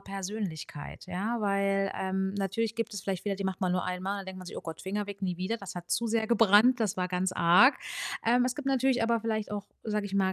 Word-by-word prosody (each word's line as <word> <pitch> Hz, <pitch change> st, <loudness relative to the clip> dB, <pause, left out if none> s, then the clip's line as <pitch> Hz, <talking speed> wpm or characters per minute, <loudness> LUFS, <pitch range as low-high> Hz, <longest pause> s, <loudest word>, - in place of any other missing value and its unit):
Persönlichkeit, 195 Hz, -6 st, -6 dB
ja, 210 Hz, +6 st, -2 dB
weil, 195 Hz, -1 st, +1 dB
ähm, 190 Hz, 0 st, -1 dB
natürlich 200 Hz, +3 st, -1 dB
gibt 230 Hz, -2 st, -2 dB
es 195 Hz, -, -5 dB
vielleicht 190 Hz, -3 st, -3 dB
Fehler 200 Hz, -2 st, -1 dB
die 195 Hz, -, -4 dB
macht 190 Hz, +1 st, -2 dB
man 185 Hz, -2 st, +1 dB
nur 180 Hz, -, 0 dB
einmal, 190 Hz, +2 st, -3 dB
denkt 190 Hz, 0 st, -8 dB
man 185 Hz, -, -9 dB
sich: -, -, -7 dB
„Oh -, -, -6 dB
Gott, 165 Hz, -1 st, -7 dB
Finger 205 Hz, +2 st, -3 dB
weg, 200 Hz, 0 st, -8 dB
nie 180 Hz, -3 st, -1 dB
wieder, 190 Hz, +6 st, -2 dB
das 195 Hz, -3 st, -8 dB
hat 175 Hz, -1 st, -8 dB
zu 235 Hz, -, +1 dB
sehr 220 Hz, 0 st, +1 dB
gebrannt. 230 Hz, +2 st, +5 dB
Das 210 Hz, -4 st, 0 dB
war 180 Hz, -1 st, -1 dB
ganz 185 Hz, +1 st, 0 dB
arg.“ 180 Hz, +11 st, +6 dB, 0.5 s
Ähm, 245 Hz, +2 st, +4 dB
es 250 Hz, -, -1 dB
gibt 295 Hz, -2 st, -7 dB
natürlich 265 Hz, -2 st, +2 dB
aber 230 Hz, 0 st, +2 dB
vielleicht 220 Hz, -2 st, -2 dB
auch, 205 Hz, -1 st, -4 dB, 0.2 s
sage 210 Hz, -1 st, -1 dB
ich 200 Hz, -, -6 dB
mal, 190 Hz, -1 st, +2 dB
200 Hz, 245 wpm, -29 LUFS, 185-225 Hz, 0.5 s, arg